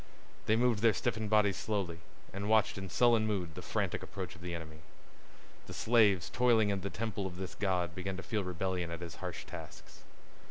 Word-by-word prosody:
They 110 - +5
moved 120 -2 +3
their 115 -1 +5
stiffened 110 -1 -1
bodies 105 -3 +4
slowly, 95 -6 -2 0.3
and 100 +2 -3
watched 110 -2 +4
in 95 -1 -6
sullen 115 +1 +4
mood 90 -6 -2
the - - -7
frantic - - -1
approach 95 -3 -6
of 90 - -15
the 90 -1 -4
enemy. 80 -2 -8 0.9
The - - -7
slaves 105 -7 +4
toiling 115 -4 +4
in 100 -1 0
the 100 - -3
temple 105 -3 -3
of 90 -1 -8
this 95 0 -5
god 90 -4 0
began 95 +1 -4
to 95 - -6
feel 110 -3 -1
rebellion 90 -1 -2
at 85 0 -5
his 85 -2 -7
harsh - - -5
tasks. - - -10
95 Hz, 195 wpm, -33 LUFS, 90-110 Hz, 0.9 s, They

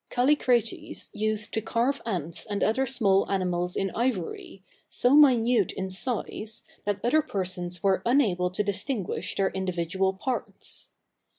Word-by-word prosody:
Callicrates 245 -3 +1
used 215 0 -1
to 220 - 0
carve 235 +5 0
ants 170 -6 -2
and 205 -1 -1
other 260 +5 +2
small 200 -6 +2
animals 180 -2 0
in 195 -1 -1
ivory, 205 -5 -3 0.3
so 245 +2 +2
minute 245 - +5
in 190 0 -4
size, 215 +1 -3 0.2
that 205 -1 -1
other 305 +7 +4
persons 180 - -4
were 195 -1 +3
unable 210 -9 +2
to 185 +3 -1
distinguish 200 +1 -2
their 195 -1 +1
individual 190 0 -1
parts. 250 +6 -5
205 Hz, 130 wpm, -27 LUFS, 185-240 Hz, 0.3 s, minute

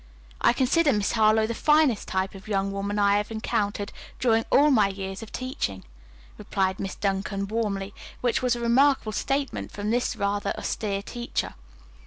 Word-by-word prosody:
I - - +5
consider 280 +5 +3
Miss 205 -2 0
Harlowe 220 -1 +4
the 230 - -2
finest 300 -4 +3
type 190 0 -1
of 195 +1 -12
young 195 -2 0
woman 200 +1 -3
I 200 0 +4
have 205 0 -2
encountered 205 -2 -2 0.3
during 225 -2 +2
all 295 +2 +5
my 215 -6 +5
years 195 0 -5
of 225 - -9
teaching," 180 - -4 0.6
replied 190 -1 -1
Miss 195 -2 -4
Duncan 195 0 -2
warmly, 200 -3 -2 0.3
which 245 -2 +1
was 250 -1 +2
a - - -5
remarkable 245 0 +3
statement 275 +5 -2
from 205 +1 -3
this 245 +1 0
rather 205 0 -1
austere 200 -3 -2
teacher. 240 +3 -4
210 Hz, 165 wpm, -26 LUFS, 200-240 Hz, 0.6 s, I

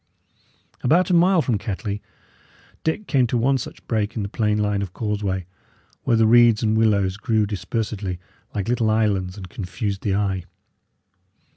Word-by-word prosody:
About 175 +8 +3
a - - +3
mile 175 -1 +4
from 120 -5 0
Kettley, 100 0 -4 0.8
Dick 185 +7 -1
came 130 -8 +2
to 120 - 0
one 130 +3 +2
such - - -8
break 110 -1 -1
in 110 - -2
the 100 - -4
plain 105 0 0
line 105 -1 0
of 95 -3 -5
causeway, 100 -4 -2 0.6
where 120 -4 +3
the 110 - +4
reeds 115 -1 +5
and 110 0 +2
willows 100 -4 +2
grew 110 -1 +1
dispersedly 100 -1 -3 0.4
like 100 -2 -2
little 120 -2 +1
islands 105 -4 +1
and 95 -2 -8
confused 95 +2 -4
the 100 -2 0
eye. 95 -3 -1
105 Hz, 160 wpm, -23 LUFS, 100-115 Hz, 0.8 s, reeds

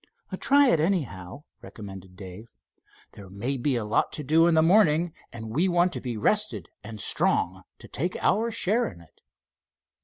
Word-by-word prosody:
"Try 280 -1 +4
it, 165 - +2
anyhow," 140 - -3 0.2
recommended 95 -3 -11
Dave. 95 +3 -10 0.7
"There 100 -2 -13
may 110 +8 -3
be 130 +1 -1
a 115 -3 -2
lot 105 - 0
to 150 - -3
do 160 +4 +3
in 170 - +2
the 160 - +4
morning, 170 -3 +3 0.2
and 110 -2 -8
we 165 +10 +1
want 175 0 +1
to - - -5
be 120 -3 -5
rested 110 - 0
and 110 0 -9
strong - - +1 0.2
to - - -14
take 175 +7 -3
our 225 +4 +1
share 225 +1 0
in 85 - -16
it." 85 -2 -21
140 Hz, 175 wpm, -25 LUFS, -, 0.7 s, Try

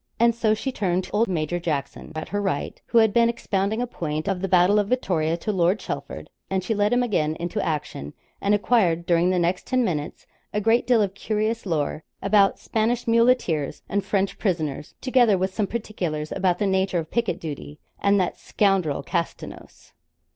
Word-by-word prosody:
And 235 0 +5
so 225 -2 +1
she 265 +5 -3
turned 185 -6 0
to - - -11
old 220 +3 +2
Major 175 -1 -1
Jackson 150 -5 -4
at 155 - -5
her 205 +1 -1
right, 190 -8 -3
who 235 - +1
had 220 -2 +5
been 235 0 +4
expounding 220 -1 -1
a - - 0
point 155 -8 -4
of 195 -3 -1
the 195 - -1
battle 185 +3 +4
of 205 - 0
Vittoria 170 -9 0
to 215 - -2
Lord 185 0 +2
Chelford; - - -6 0.2
and 190 -1 -1
she 225 - -1
led 205 0 +1
him 245 0 +3
again 160 -10 0
into 175 +6 -3
action, 150 - -4 0.3
and 200 +1 +3
acquired 190 -6 +2
during 175 +1 +3
the 185 - +1
next 175 +1 0
ten 255 -1 +2
minutes 150 -6 -3 0.3
a 210 - +1
great 225 +3 +2
deal 240 -4 +4
of 195 -1 -2
curious 215 +2 -2
lore 155 -2 -1 0.2
about 200 0 +3
Spanish 230 +2 -1
muleteers 230 - +2
and 200 0 -1
French 195 0 -1
prisoners, 155 -7 -2
together 245 -6 +4
with 190 +1 -1
some 210 -1 0
particulars 175 -10 -4
about 185 -2 +1
the 205 - 0
nature 190 -1 +1
of 160 -2 -4
picket 235 -3 0
duty, 150 -1 -7 0.2
and 200 0 +3
'that 180 - -1
scoundrel, 195 -8 +1
Castanos.' 170 -3 -5
195 Hz, 190 wpm, -24 LUFS, 170-220 Hz, 0.3 s, And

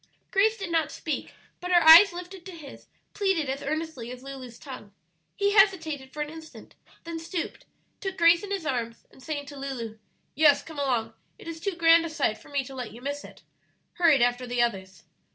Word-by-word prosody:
Grace 430 +3 +3
did 390 -5 -5
not 320 -2 +1
speak, 315 - -4 0.3
but 360 - -6
her 345 -2 +5
eyes 340 +5 +10
lifted 360 +1 -9
to 375 - -9
his, 300 -5 -12 0.3
pleaded 385 -7 0
as 270 +1 -3
earnestly 310 -5 -4
as 250 +1 -9
Lulu's 260 -3 -9
tongue. 255 -8 -10 0.4
He 405 0 +1
hesitated 325 -10 +2
for 300 - -3
an 295 - -8
instant, 320 0 -12 0.3
then 335 -1 -6
stooped, 335 +1 -5 0.3
took 385 -1 -5
Grace 335 0 +5
in 405 - -7
his 395 -5 -3
arms, 235 -5 -3
and - - -18
saying 290 +1 -4
to 285 0 -10
Lulu, 235 -5 -6 0.3
"Yes, 295 0 +4
come 320 -3 -9
along; 240 -5 -1 0.2
it - - -13
is 330 -1 -6
too 390 +1 -3
grand 330 0 +5
a 335 - -4
sight 280 -9 -1
for - - -17
me 285 -1 -1
to 270 - -10
let 250 -3 -6
you 235 - -11
miss 285 +3 -4
it," - - -14 0.6
hurried 310 -8 +5
after 245 +1 0
the 245 0 -3
others. 190 -7 -1
305 Hz, 205 wpm, -27 LUFS, 260-335 Hz, 0.6 s, eyes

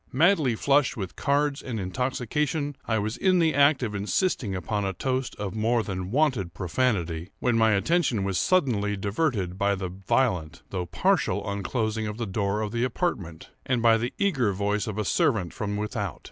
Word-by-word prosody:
Madly 155 - +3
flushed 140 +3 +2
with 95 -4 -5
cards 145 0 +1
and 115 -4 -4
intoxication, 130 - -1
I 110 - +1
was 110 +3 -2
in 185 -1 +3
the 165 -2 +3
act 140 -1 +4
of 110 -3 -2
insisting 105 - 0
upon 105 +2 -2
a 95 0 -1
toast 130 +6 -2
of 100 -3 -4
more 115 +1 +1
than 95 -2 -4
wonted 120 - +1
profanity, 90 -4 -1
when 125 -2 +1
my 110 -1 +4
attention 125 - +1
was 95 -3 0
suddenly 110 - +1
diverted 100 - -1
by 100 0 +2
the 95 -1 -4
violent, 95 - -1
although 90 -2 -2
partial - - +1
unclosing 110 +2 -2
of 105 0 -5
the 120 - -2
door 100 +1 -1
of 105 -1 -3
the 120 +1 -1
apartment, 110 - -3
and 125 -2 0
by 115 -1 +6
the 120 +2 -2
eager 135 - +1
voice 105 +2 -1
of 105 -1 -4
a 105 - -1
servant 95 -2 +1
from 105 -1 -3
without. 105 -3 -3
110 Hz, 180 wpm, -26 LUFS, 100-130 Hz, -, by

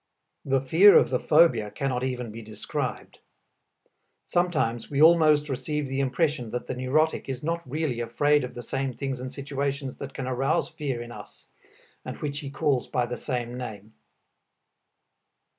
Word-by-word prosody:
The 135 -1 +1
fear 165 +10 +7
of - - +3
the 125 - +1
phobia 150 -10 +4
cannot 125 +3 -2
even 125 -3 -3
be 115 +2 -8
described. 110 -1 -5 1.0
Sometimes 150 -10 0
we 140 - -2
almost 155 -2 +6
receive 150 +2 -2
the 135 +1 -3
impression 140 -2 0
that 125 +2 -4
the - - -4
neurotic 140 +5 0
is 130 0 -4
not 170 +2 -1
really 145 -4 -2
afraid 145 +5 +2
of 125 - -6
the 120 - -6
same 135 +2 -2
things 135 0 -4
and 130 0 -6
situations 140 0 -3
that 140 -1 -8
can 135 - -4
arouse 135 +6 0
fear 135 -6 -4
in 120 - -10
us, - - -12 0.6
and - - -6
which 145 -1 -4
he 140 - -6
calls 140 -3 0
by 125 - 0
the 125 +1 -4
same 120 -3 -4
name. 110 -4 -7
135 Hz, 160 wpm, -26 LUFS, 125-150 Hz, 1.0 s, fear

